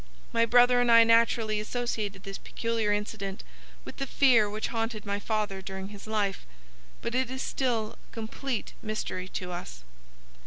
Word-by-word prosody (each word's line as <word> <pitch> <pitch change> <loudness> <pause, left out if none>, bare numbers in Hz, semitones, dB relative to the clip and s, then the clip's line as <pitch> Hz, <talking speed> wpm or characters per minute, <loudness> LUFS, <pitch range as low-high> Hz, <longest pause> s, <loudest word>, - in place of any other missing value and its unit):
My 230 0 +3
brother 245 +1 +6
and 240 -1 +3
I 230 0 +9
naturally 230 -1 +3
associated 215 -3 -3
this 195 0 -6
peculiar 230 -2 -1
incident 205 -1 -3 0.4
with - - -9
the 275 - -3
fear 240 -8 +5
which 215 +1 -3
haunted 225 -2 -2
my 200 0 -1
father 210 -3 -2
during 190 0 -6
his 205 0 -10
life; 205 -3 -1 0.6
but 235 - -2
it 255 0 +1
is 260 0 -3
still 230 -5 -1
a - - -28
complete 230 +2 -4
mystery 215 -4 -3
to 180 -1 -5
us." 60 - -7
220 Hz, 160 wpm, -29 LUFS, 200-235 Hz, 0.6 s, I